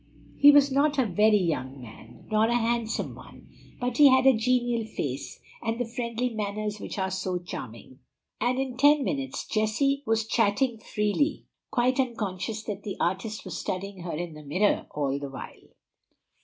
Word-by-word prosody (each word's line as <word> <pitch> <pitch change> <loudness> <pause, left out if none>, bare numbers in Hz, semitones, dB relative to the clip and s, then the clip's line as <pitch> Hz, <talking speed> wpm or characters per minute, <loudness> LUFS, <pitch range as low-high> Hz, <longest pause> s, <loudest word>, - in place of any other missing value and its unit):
He 285 - +7
was 285 -1 +6
not 285 +2 +2
a 260 - +3
very 210 +2 +4
young 140 -7 -2
man, 110 -1 -13
nor 215 0 +4
a 235 - +1
handsome 230 -1 -1
one, - - -14 0.3
but 245 -1 -2
he 290 -2 +8
had 260 0 +4
a 265 -2 +7
genial 240 0 +1
face, 140 -11 -5 0.2
and 225 0 -2
the 245 - 0
friendly 235 +1 -2
manners 210 -1 -3
which - - -6
are 190 -1 -1
so 185 -1 -2
charming; 130 -8 -9 0.4
and 250 +1 +1
in 260 -2 -3
ten 290 +1 +5
minutes 270 -2 -3
Jessie 250 +6 +1
was 225 0 +1
chatting 225 +2 +1
freely, 210 +9 -1 0.2
quite 255 +2 +1
unconscious 215 -4 -2
that 205 -2 -5
the 200 -1 -6
artist 190 +5 -2
was 180 -2 -5
studying 195 +1 -4
her 170 0 -5
in 170 -2 -5
a 150 - -11
mirror 180 +9 +1
all 140 -2 -2
the 140 -1 -6
while. 135 - -10
220 Hz, 170 wpm, -27 LUFS, 185-250 Hz, 0.4 s, he